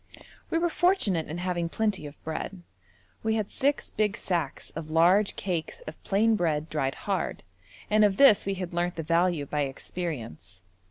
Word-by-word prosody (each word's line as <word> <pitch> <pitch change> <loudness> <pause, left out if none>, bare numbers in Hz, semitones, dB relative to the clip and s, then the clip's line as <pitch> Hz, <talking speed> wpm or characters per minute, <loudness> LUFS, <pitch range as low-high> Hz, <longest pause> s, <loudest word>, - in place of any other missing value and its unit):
We 330 - +1
were 340 0 +1
fortunate 270 - +2
in 160 - -5
having 175 -1 -1
plenty 205 -6 -1
of 145 - -11
bread. 175 +3 -5 0.6
We 220 0 0
had 215 -2 -2
six 280 +2 0
big 210 -1 0
sacks 170 -7 -2
of 160 -1 -7
large 180 +6 +4
cakes 180 - -3
of - - -10
plain 220 +3 +3
bread 160 -5 0
dried 135 -3 -1
hard, - - -2 0.4
and 215 0 +4
of 200 -2 +3
this 270 -9 +6
we 195 - 0
had 180 -2 -5
learnt 175 +1 -1
the 165 - -4
value 170 -1 +2
by 150 +1 -3
experience. 115 - -5
175 Hz, 170 wpm, -27 LUFS, 155-210 Hz, 0.6 s, this